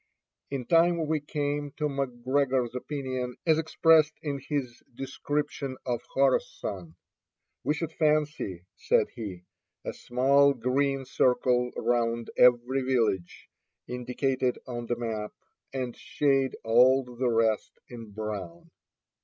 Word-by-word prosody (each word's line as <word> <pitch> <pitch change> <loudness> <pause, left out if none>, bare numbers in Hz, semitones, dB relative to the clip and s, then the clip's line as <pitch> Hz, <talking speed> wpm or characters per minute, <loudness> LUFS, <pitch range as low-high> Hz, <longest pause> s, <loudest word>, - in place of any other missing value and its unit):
In 135 -3 -4
time 170 +1 +3
we 155 0 +1
came 145 -1 -3
to 150 - -4
McGregor's 130 -2 0
opinion 130 -2 -4
as 160 -2 +4
expressed 160 -1 +4
in 140 -3 -2
his 135 -4 -4
description 140 0 -3
of 120 -2 -1
Khorassan. 100 -10 0 0.7
"We 150 - +1
should 165 +1 -3
fancy," 150 - 0
said - - +2
he, 95 -6 -7 0.4
"a - - -3
small 140 +3 +3
green 135 +2 0
circle 125 -1 +2
round 115 -1 0
every 125 +2 +4
village 115 -9 -1 0.4
indicated 125 +1 -1
on 120 -2 -5
the 120 - 0
map, 110 -3 -4 0.4
and 130 -3 -3
shade 135 -2 +1
all 125 +4 +5
the 125 0 -2
rest 115 -2 +1
in 115 -3 -9
brown." 100 -5 -6
130 Hz, 115 wpm, -28 LUFS, 120-140 Hz, 0.7 s, all